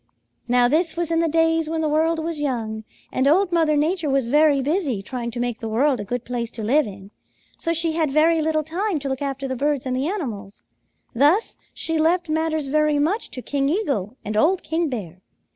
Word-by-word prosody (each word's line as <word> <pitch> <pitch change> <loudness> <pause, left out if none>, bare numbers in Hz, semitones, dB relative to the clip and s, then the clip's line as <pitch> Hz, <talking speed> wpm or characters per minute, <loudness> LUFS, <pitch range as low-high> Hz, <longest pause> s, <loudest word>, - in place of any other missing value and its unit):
Now 245 0 +4
this 320 +5 +1
was 340 -1 -1
in 330 - +2
the 335 - +2
days 325 0 +2
when 320 0 -1
the 310 - +1
world 320 +2 +1
was 320 -1 -3
young, 220 -6 -3 0.3
and 260 +1 +1
Old 360 +5 +3
Mother 320 -3 +2
Nature 320 +1 0
was 270 -2 +1
very 295 +3 +4
busy 275 - -1
trying 240 +2 -4
to 240 +1 -6
make 240 -1 -2
the 225 -3 -5
world 255 +4 +2
a - - -3
good 245 +4 -4
place 235 -2 -3
to 225 - -6
live 275 +6 +2
in, 195 0 -11 0.4
so 330 - -2
she 330 0 +3
had 315 -2 0
very 315 +3 +3
little 310 0 0
time 355 +4 -2
to 285 -1 -4
look 265 0 -3
after 275 -1 -3
the 260 - -3
birds 285 0 -1
and 255 -1 -1
the 265 +3 -1
animals. 225 - -5 0.5
Thus 295 - +3 0.2
she 325 -1 -1
left 340 +2 +2
matters 315 -1 0
very 300 +1 +2
much 330 +10 0
to 255 - -8
King 275 -1 0
Eagle 275 - -1
and 210 +1 -3
old 345 - +2
King 325 0 -1
Bear. 185 -8 -6
295 Hz, 215 wpm, -22 LUFS, 250-325 Hz, 0.5 s, Now